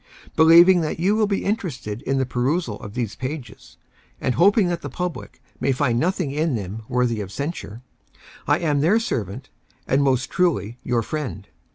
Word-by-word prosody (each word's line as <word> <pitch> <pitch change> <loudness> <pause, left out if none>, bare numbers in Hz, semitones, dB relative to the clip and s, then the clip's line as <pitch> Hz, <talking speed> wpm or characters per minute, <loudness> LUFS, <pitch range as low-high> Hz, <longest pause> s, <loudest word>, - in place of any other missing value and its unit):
Believing 170 +3 +7
that 155 0 -3
you 195 +5 +2
will 215 -1 +2
be 200 -1 -1
interested 155 - -3
in 135 +1 -1
the 135 - +1
perusal 125 - -1
of 105 +2 -9
these 120 -4 -3
pages 130 0 -7 0.2
— - - -34
and 130 - 0
hoping 200 - +4
that 170 -1 -2
the - - -6
public 180 -2 -6 0.2
may 135 - +1
find 125 -3 +1
noth 180 +6 0
ing 140 - -1
in 150 -1 0
them 105 +1 -5
worthy 120 -3 0
of 95 -2 -7
censure 135 - -5 0.3
— - - -22
I - - +4
am 150 -4 0
their 190 +9 +4
servant, 105 - -4 0.3
and 135 +2 +2
most 130 -2 +1
truly, 130 - 0
your 120 -2 0
friend. 130 -8 -5
140 Hz, 190 wpm, -22 LUFS, 120-170 Hz, 0.3 s, Believing